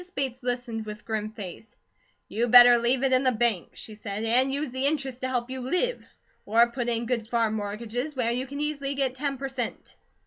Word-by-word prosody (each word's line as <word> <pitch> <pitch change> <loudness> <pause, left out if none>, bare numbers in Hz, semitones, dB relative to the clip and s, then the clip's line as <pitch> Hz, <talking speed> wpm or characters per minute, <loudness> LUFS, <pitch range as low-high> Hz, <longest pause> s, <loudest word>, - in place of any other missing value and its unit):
Bates 265 -2 -2
listened 245 -3 -3
with 210 0 -8
grim 215 -1 -3
face: 215 0 -9 0.5
"You 235 +3 -1
better 245 0 +9
leave 245 +3 +1
it 265 -1 +3
in 255 - +5
the 255 - +4
bank," 225 -6 -1
she 220 - -7
said, 210 0 -5
"and 250 +4 +3
use 285 -1 -2
the 260 +2 +1
interest 270 -4 -1
to 260 - -1
help 250 -1 -2
you 260 0 -5
live, 360 - 0 0.4
or 230 +3 +4
put 240 -1 -2
it 235 - +1
in 235 - -4
good 230 -2 -2
farm 230 -2 +1
mortgages, 225 +7 -4
where 240 -3 +1
you 255 +3 -2
can 280 +2 -7
easily 285 -2 -2
get 270 -2 +2
ten 275 +1 -3
per 275 +1 -4
cent." 260 -3 -5
245 Hz, 215 wpm, -26 LUFS, 225-265 Hz, 0.5 s, better